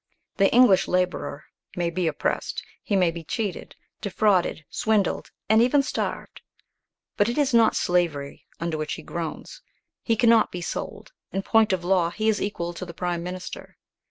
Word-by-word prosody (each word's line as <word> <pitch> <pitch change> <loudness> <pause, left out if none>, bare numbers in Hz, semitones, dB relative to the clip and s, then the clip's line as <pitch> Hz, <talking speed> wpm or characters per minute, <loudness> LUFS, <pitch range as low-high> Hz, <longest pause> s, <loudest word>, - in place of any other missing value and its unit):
The 195 - +4
English 235 -6 +5
labourer 180 -5 -1 0.3
may 175 -1 -1
be 180 0 -1
oppressed, 155 - -2 0.2
he 205 - -1
may 180 -3 +3
be 165 0 -8
cheated, 200 +2 -4 0.3
defrauded, 195 -5 +1
swindled, 215 -3 0 0.2
and 220 +1 +5
even 275 +4 +4
starved; - - -4 0.8
but 205 +2 +3
it 240 - -3
is 285 -4 +2
not 230 -1 +5
slavery 165 -6 -1
under 165 -2 -2
which 155 -1 -3
he - - -7
groans. 170 - -6 0.4
He 230 - +1
cannot 230 0 +4
be 180 - -5
sold; 175 - -6 0.2
in 195 - -2
point 225 -1 +3
of 185 -2 -1
law 180 -2 +2
he 215 +5 -2
is 215 - +1
equal 175 -4 -3
to 175 - -7
the 170 -2 -8
prime 175 -1 -2
minister. 180 +1 -7
185 Hz, 165 wpm, -25 LUFS, 170-220 Hz, 0.8 s, English